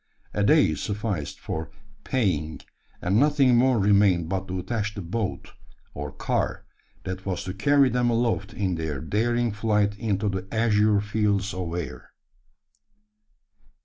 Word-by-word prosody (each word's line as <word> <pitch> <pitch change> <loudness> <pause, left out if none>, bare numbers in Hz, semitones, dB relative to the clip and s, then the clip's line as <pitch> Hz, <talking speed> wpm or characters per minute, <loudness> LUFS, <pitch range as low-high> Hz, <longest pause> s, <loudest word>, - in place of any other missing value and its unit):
A 105 - 0
day 150 +8 +4
sufficed 105 -7 -3
for 80 0 -5 0.3
"paying;" 90 - -1 0.4
and 95 +5 +2
nothing 140 -3 +4
more 125 +1 +4
remained 100 -4 +3
but 95 +1 -2
to 95 - -3
attach 105 +2 -3
the 100 - -5
"boat," 100 +4 -3 0.4
or 75 0 -5
"car," - - -2 0.4
that 95 0 -5
was 95 0 -3
to 90 0 -5
carry 140 +8 +4
them 120 0 +1
aloft 115 -4 0
in 95 -3 -1
their 80 -4 -3
daring 120 - 0
flight 105 -1 +1
into 105 -2 -1
the 95 -1 -3
"azure 105 -2 +3
fields 105 -2 0
of 90 -2 -4
air." 90 -2 -6
100 Hz, 140 wpm, -25 LUFS, 95-115 Hz, 0.4 s, day